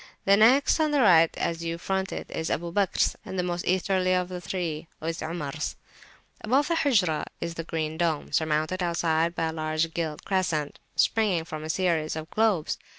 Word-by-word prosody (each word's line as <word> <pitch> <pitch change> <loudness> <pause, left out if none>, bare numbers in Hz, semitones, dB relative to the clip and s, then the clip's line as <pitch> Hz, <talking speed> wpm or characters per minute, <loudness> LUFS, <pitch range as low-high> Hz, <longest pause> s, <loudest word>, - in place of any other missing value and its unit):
The 195 - +6
next, 250 +9 +5
on 310 -1 +3
the 290 -2 +2
right 165 -7 +6
as 170 0 -2
you 165 0 -3
front 190 +2 -2
it, - - -6
is 160 - -3
Abu 170 +1 -2
Bakr's, 195 0 +1
and 190 - -6
the 180 - +1
most 175 -1 -3
Easterly 185 0 +2
of 180 0 -1
the 180 -1 -6
three 170 -4 -4
is 165 +2 -4
Omar's. 155 -2 -4 0.7
Above 270 +8 +2
the 335 - +2
Hujrah 195 - +2
is 170 0 -3
the 165 - -5
Green 160 0 -3
Dome, 165 -4 0
surmounted 155 +3 0
outside 170 -1 +1
by 165 - 0
a - - -5
large 155 +1 -1
gilt 160 -3 -3
crescent 170 -6 -1 0.2
springing 200 -7 +2
from 155 -1 -6
a 155 - -6
series 165 -3 0
of 160 +1 -7
globes. 215 -8 +1
170 Hz, 190 wpm, -26 LUFS, 160-190 Hz, 0.7 s, The